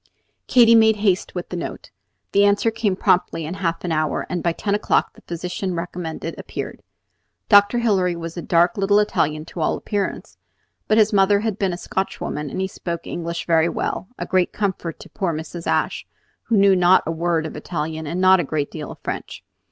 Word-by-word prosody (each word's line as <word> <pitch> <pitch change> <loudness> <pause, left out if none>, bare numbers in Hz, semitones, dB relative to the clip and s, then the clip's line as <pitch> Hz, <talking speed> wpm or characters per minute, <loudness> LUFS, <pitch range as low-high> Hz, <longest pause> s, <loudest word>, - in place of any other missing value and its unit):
Katy 235 -2 +6
made 220 -1 +6
haste 200 -4 0
with 180 - -5
the - - -5
note. 170 - -6 0.4
The 200 - +4
answer 205 +2 +3
came 220 -4 0
promptly 175 -3 +1
in 160 - -4
half 170 -3 -2
an 175 - -2
hour, 155 -1 0
and 175 -1 -1
by 170 - +1
ten 200 +4 -2
o'clock 210 - +1
the - - -18
physician 180 +2 -4
recommended 170 -1 -5
appeared. - - -6 0.7
Dr. 205 +2 +6
Hilary 195 -7 +2
was 165 -1 -6
a 175 - -4
dark 175 +6 +2
little 200 +1 +3
Italian 155 -7 +1
to 170 - -9
all - - +1
appearance; 205 -2 -4 0.5
but 215 - +3
his 215 -1 +4
mother 200 +1 +4
had 220 -2 -2
been 195 -2 +1
a 175 - -4
Scotch 190 +2 -3
woman, 150 -1 -4
and 185 - -5
he 190 - 0
spoke 170 -3 -6
English 170 0 -4
very 165 0 +3
well, 185 - -3
a - - -4
great 185 -2 +1
comfort 190 -5 -3
to - - -12
poor 175 -5 -2
Mrs. 165 +2 -7
Ashe, - - 0 0.4
who 225 - +2
knew 195 -1 +5
not 180 +1 +5
a 165 - -1
word 165 -1 0
of 155 - -6
Italian 155 0 -4
and 170 +4 -3
not 185 0 +6
a - - +1
great 145 0 -2
deal 155 -3 -6
of - - -10
French. - - -5
180 Hz, 205 wpm, -22 LUFS, 165-200 Hz, 0.7 s, Katy